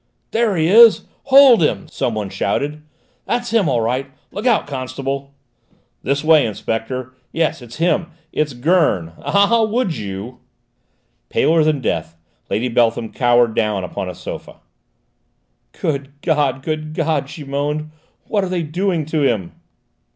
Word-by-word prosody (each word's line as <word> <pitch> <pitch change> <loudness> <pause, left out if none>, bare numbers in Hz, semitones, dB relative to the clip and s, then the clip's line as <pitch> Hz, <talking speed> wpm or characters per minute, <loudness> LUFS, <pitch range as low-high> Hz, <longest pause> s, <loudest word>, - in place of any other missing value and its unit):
"There 225 -3 +1
he 160 -2 +2
is: 225 +4 +7 0.2
hold 270 -5 +7
him!" 110 -10 0
some 120 - -2
one 105 -3 -4
shouted. 145 +8 -2 0.4
"That's 240 -1 -2
him 215 -9 +2
all 120 -3 +1
right! 130 +4 -1 0.2
Look 215 +5 -3
out, - - +3
constable!" 135 +1 -5 0.7
"This 140 +4 -1
way, 155 -1 +5
Inspector! 115 +4 -4 0.2
Yes, 160 -4 -1
it's 120 -1 -11
him, 175 +1 +1 0.2
it's 150 -2 -1
Gurn! 125 - +1
Ah, 200 +3 +3
would 220 -5 0
you!" 100 +5 -6 0.9
Paler 160 0 +3
than 150 -3 +1
death, 80 -6 -2 0.3
Lady 120 +4 0
Beltham 115 -1 +1
cowered 120 -2 +3
down 105 -3 0
upon 90 +1 -4
a 90 - -7
sofa. - - -9 1.2
"Good 140 -2 -2
God! 145 -5 +1
Good 155 0 -4
God!" 155 -4 0
she 150 - -8
moaned. 145 +2 -3 0.3
"What 205 -2 -1
are 190 - -3
they 180 -2 -1
doing 170 +1 -1
to 155 0 -1
him!" 110 -11 0
145 Hz, 145 wpm, -19 LUFS, 120-165 Hz, 1.2 s, is